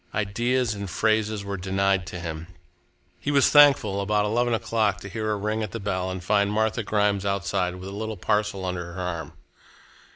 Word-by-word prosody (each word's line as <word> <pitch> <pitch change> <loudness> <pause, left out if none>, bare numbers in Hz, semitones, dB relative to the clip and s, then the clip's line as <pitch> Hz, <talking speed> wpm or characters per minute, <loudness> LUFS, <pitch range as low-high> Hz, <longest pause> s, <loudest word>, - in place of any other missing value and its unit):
Ideas 120 +3 0
and 100 -2 -6
phrases 110 +1 0
were 100 0 -3
denied 95 0 0
to 90 0 -6
him. 80 -1 -6 0.7
He - - -3
was 140 -2 +4
thankful, 135 -9 +6
about 105 +1 +1
eleven 120 +3 +1
o'clock, 110 -4 0
to 100 - -8
hear 110 +1 -2
a - - +1
ring 105 +2 -2
at 105 - -4
the 115 - -4
bell 95 -2 -2
and 95 -1 -5
find 100 +2 +2
Martha 110 +2 +1
Grimes 105 -2 +1
outside 95 -2 -1
with 90 +1 -8
a - - -8
little 110 +1 -4
parcel 105 -3 0
under 90 -1 -4
her 95 - -7
arm. 85 -4 -4
100 Hz, 190 wpm, -25 LUFS, 95-110 Hz, 0.7 s, thankful